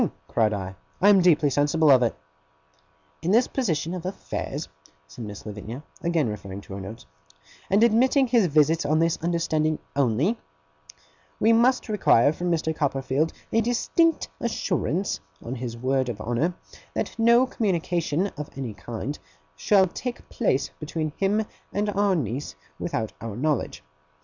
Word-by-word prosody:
cried 110 Hz, -2 st, +2 dB
I. 95 Hz, -2 st, -4 dB, 0.3 s
'I 200 Hz, -, +5 dB
am 200 Hz, -2 st, +7 dB
deeply 160 Hz, -5 st, +4 dB
sensible 145 Hz, +2 st, +3 dB
of 130 Hz, -2 st, +6 dB
it.' 120 Hz, -, +1 dB, 1.1 s
'In 165 Hz, -, -2 dB
this 235 Hz, +5 st, +5 dB
position 170 Hz, -, -1 dB
of 180 Hz, -2 st, -5 dB
affairs,' 185 Hz, -, -4 dB, 0.4 s
said 75 Hz, +10 st, -9 dB
Miss 105 Hz, -1 st, -9 dB
Lavinia, 110 Hz, +6 st, -7 dB, 0.2 s
again 170 Hz, -5 st, +1 dB
referring 100 Hz, -2 st, -6 dB
to 100 Hz, -, -11 dB
her 100 Hz, -, -5 dB
notes, 110 Hz, +5 st, -9 dB, 0.6 s
'and 200 Hz, +3 st, +4 dB
admitting 255 Hz, +4 st, +4 dB
his 235 Hz, -6 st, +3 dB
visits 155 Hz, +1 st, +3 dB
on 150 Hz, +2 st, +2 dB
this 165 Hz, 0 st, +2 dB
understanding 160 Hz, -2 st, 0 dB, 0.2 s
only, 140 Hz, -, +1 dB, 1.0 s
we 225 Hz, +1 st, +5 dB
must 250 Hz, +3 st, +3 dB
require 150 Hz, -, +4 dB
from 175 Hz, +3 st, -3 dB
Mr. 160 Hz, -2 st, 0 dB
Copperfield 135 Hz, +1 st, 0 dB, 0.2 s
a 225 Hz, -, +4 dB
distinct 295 Hz, +8 st, +1 dB
assurance, 195 Hz, -, -1 dB, 0.3 s
on 120 Hz, -, -4 dB
his 120 Hz, -2 st, -5 dB
word 130 Hz, +1 st, 0 dB
of 110 Hz, -4 st, -5 dB
honour, 120 Hz, +11 st, -1 dB, 0.4 s
that -, -, -2 dB
no 235 Hz, +2 st, +6 dB
communication 175 Hz, -, 0 dB
of 150 Hz, 0 st, -5 dB
any 130 Hz, -5 st, -4 dB
kind 120 Hz, +7 st, -6 dB, 0.4 s
shall 190 Hz, -, +4 dB
take 240 Hz, +7 st, -6 dB
place 140 Hz, -, 0 dB
between 155 Hz, 0 st, -3 dB
him 205 Hz, +3 st, +1 dB, 0.3 s
and 205 Hz, +1 st, 0 dB
our 200 Hz, -1 st, +2 dB
niece 135 Hz, -, -3 dB, 0.2 s
without 110 Hz, -1 st, -3 dB
our 115 Hz, -3 st, -5 dB
knowledge. 145 Hz, +2 st, -1 dB
155 Hz, 150 wpm, -25 LUFS, 125-200 Hz, 1.1 s, am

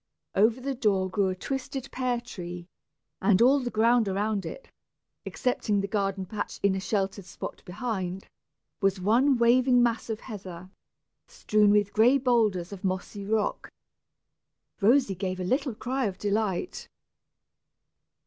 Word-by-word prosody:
Over 220 Hz, +5 st, +3 dB
the 275 Hz, +2 st, -3 dB
door 195 Hz, -7 st, +1 dB
grew 195 Hz, 0 st, +1 dB
a 185 Hz, -, -1 dB
twisted 270 Hz, +5 st, -5 dB
pear 250 Hz, -2 st, -1 dB
tree, 175 Hz, -7 st, -8 dB, 0.6 s
and 190 Hz, 0 st, +4 dB
all 260 Hz, +5 st, +5 dB
the 250 Hz, -2 st, -3 dB
ground 230 Hz, 0 st, +3 dB
around 200 Hz, +1 st, -1 dB
it, -, -, -9 dB, 0.6 s
excepting 225 Hz, -5 st, 0 dB
the 195 Hz, -, -1 dB
garden 195 Hz, -2 st, -1 dB
patch 205 Hz, +2 st, -5 dB
in 200 Hz, -1 st, +4 dB
a 190 Hz, -, -2 dB
sheltered 195 Hz, -1 st, -2 dB
spot 175 Hz, -, -8 dB
behind, 190 Hz, -2 st, -4 dB, 0.5 s
was 195 Hz, -1 st, +2 dB
one 240 Hz, +8 st, +3 dB
waving 245 Hz, +1 st, +4 dB
mass 235 Hz, -1 st, 0 dB
of 220 Hz, -1 st, -3 dB
heather, 185 Hz, -5 st, -9 dB, 0.6 s
strewn 210 Hz, -1 st, +2 dB
with 205 Hz, -1 st, +3 dB
gray 240 Hz, +5 st, +5 dB
boulders 220 Hz, -9 st, +1 dB
of 195 Hz, -, -10 dB
mossy 190 Hz, +2 st, -3 dB
rock. 215 Hz, -1 st, -1 dB, 1.1 s
Rosy 235 Hz, 0 st, +4 dB
gave 185 Hz, 0 st, -4 dB
a -, -, -2 dB
little 260 Hz, +5 st, 0 dB
cry 260 Hz, +3 st, -2 dB
of 190 Hz, -3 st, -3 dB
delight. 210 Hz, -, -2 dB
210 Hz, 140 wpm, -27 LUFS, 190-245 Hz, 1.1 s, all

